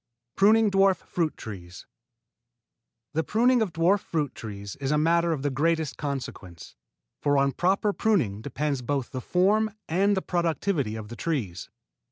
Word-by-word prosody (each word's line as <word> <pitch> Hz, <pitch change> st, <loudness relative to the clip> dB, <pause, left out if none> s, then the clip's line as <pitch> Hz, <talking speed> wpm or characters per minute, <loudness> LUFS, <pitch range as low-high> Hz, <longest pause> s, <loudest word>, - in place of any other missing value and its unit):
IV -, -, -62 dB
PRUNING 215 Hz, +2 st, +5 dB
DWARF 195 Hz, -1 st, +4 dB
FRUIT 165 Hz, -2 st, -2 dB
TREES 90 Hz, -5 st, -9 dB, 1.3 s
The 160 Hz, +1 st, +1 dB
pruning 240 Hz, +5 st, +3 dB
of 210 Hz, -5 st, 0 dB
dwarf 170 Hz, +5 st, +3 dB
fruit 150 Hz, -7 st, -2 dB
trees 100 Hz, -2 st, -7 dB
is 135 Hz, -1 st, -3 dB
a 150 Hz, -, +2 dB
matter 170 Hz, +2 st, +2 dB
of 145 Hz, -4 st, -2 dB
the 145 Hz, -, 0 dB
greatest 160 Hz, +2 st, 0 dB
consequence, 120 Hz, -, -6 dB, 0.5 s
for 145 Hz, -1 st, +2 dB
on 140 Hz, 0 st, +3 dB
proper 195 Hz, +6 st, +1 dB
pruning 140 Hz, -, +1 dB
depend 140 Hz, -1 st, -3 dB
both 140 Hz, -4 st, -1 dB
the 130 Hz, -, -4 dB
form 205 Hz, -, +2 dB, 0.2 s
and 195 Hz, +4 st, +2 dB
the 190 Hz, -, -1 dB
productivity 170 Hz, -, -1 dB
of 110 Hz, -1 st, -7 dB
the 120 Hz, -, -7 dB
trees. 115 Hz, -, -3 dB
155 Hz, 160 wpm, -26 LUFS, 130-190 Hz, 1.3 s, PRUNING